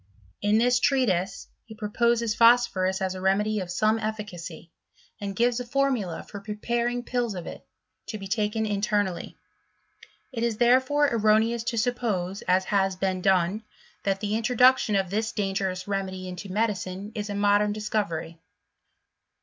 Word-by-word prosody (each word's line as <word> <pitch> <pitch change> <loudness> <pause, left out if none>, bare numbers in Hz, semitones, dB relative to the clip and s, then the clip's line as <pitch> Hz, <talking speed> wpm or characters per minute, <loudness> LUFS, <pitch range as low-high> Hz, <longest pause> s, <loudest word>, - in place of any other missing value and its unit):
In 210 +1 +3
this 245 +2 +3
treatise, 200 -10 +1 0.2
he 220 - -12
proposes 230 +1 +1
phosphorus 230 -6 +3
as 190 -1 -1
a 185 - -7
remedy 210 +3 +1
of 185 -2 -5
some 215 +5 +1
efficacy, 205 -7 -6 0.5
and 200 -2 -5
gives 240 +2 +2
a - - -3
formula 245 -8 -1
for 205 - -9
preparing 235 +4 -2
pills 240 -4 -2
of 175 - -6
it, - - -8 0.4
to 215 - -4
be 195 -1 -8
taken 215 +1 0
internally. 205 -3 -1 0.9
It 235 -3 -4
is 235 -2 0
therefore 260 +5 +3
erro 215 -2 +4
neous 230 +1 -1
to 235 - -1
suppose, 215 -6 -1
as 185 +1 +3
has 195 -1 +2
been 185 0 -1
done, 190 +2 +2 0.4
that 195 -1 -1
the 210 -1 -2
intro 230 +2 -1
duction 250 -4 +5
of 190 -2 -3
this 220 +2 -1
dangerous 195 -3 -2
remedy 190 -2 -3
into 185 +2 -7
medicine 200 -1 -2
is 210 -2 -4
4. 205 - -4
modem 205 +1 +3
discovery. 200 -6 -3
210 Hz, 155 wpm, -26 LUFS, 190-230 Hz, 0.9 s, duction